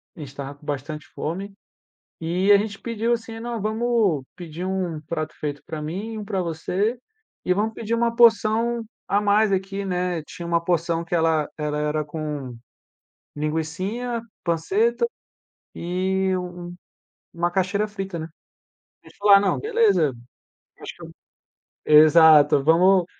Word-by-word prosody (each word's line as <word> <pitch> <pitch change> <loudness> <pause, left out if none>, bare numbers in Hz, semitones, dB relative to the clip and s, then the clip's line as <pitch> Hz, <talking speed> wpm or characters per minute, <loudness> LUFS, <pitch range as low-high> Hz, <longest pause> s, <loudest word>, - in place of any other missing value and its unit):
a - - -14
gente 145 -3 -7
estava 140 +1 -7
com 145 - -20
bastante 145 +2 -5
fome, 190 +6 -4 0.7
e 180 +5 +1
a 200 - +9
gente 200 -1 -3
pediu 230 0 -1
assim: 225 -1 -5
“Não, 235 -1 -4
vamos 215 - +1
pedir 175 0 -7
um 185 -5 -2
prato 155 0 -4
feito 145 -1 -4
para 155 -1 -6
mim, 195 +9 -5
um 210 - -6
para 195 -2 -1
você, 180 +7 -1 0.5
e 180 - +3
vamos 215 +4 -1
pedir 225 +1 -4
uma 235 0 0
porção 230 0 +3 0.2
a 200 - +2
mais 210 +1 +3
aqui, 195 +1 -2
né”. 180 -3 -1
Tinha 170 +3 -9
uma 170 0 +1
porção 170 -1 0
que 170 - -8
ela 160 -2 +2
era 150 0 -1
com 150 -4 -5 0.8
linguicinha, 185 +11 -3 0.2
panceta 195 - +1 0.7
e 190 +2 -1
uma 180 -1 -5 0.7
macaxeira 180 +4 0
frita, 195 -4 -5
né. 160 - -5 0.8
A - - -19
gente - - -18
falou: 205 0 +5
“Ah - - +7
não, 195 -1 0
beleza", 425 - +2 0.7
acho - - -8
que - - -10 0.8
exato, 155 -1 +7
"Vamo 180 +4 +5
180 Hz, 140 wpm, -23 LUFS, 160-210 Hz, 0.8 s, a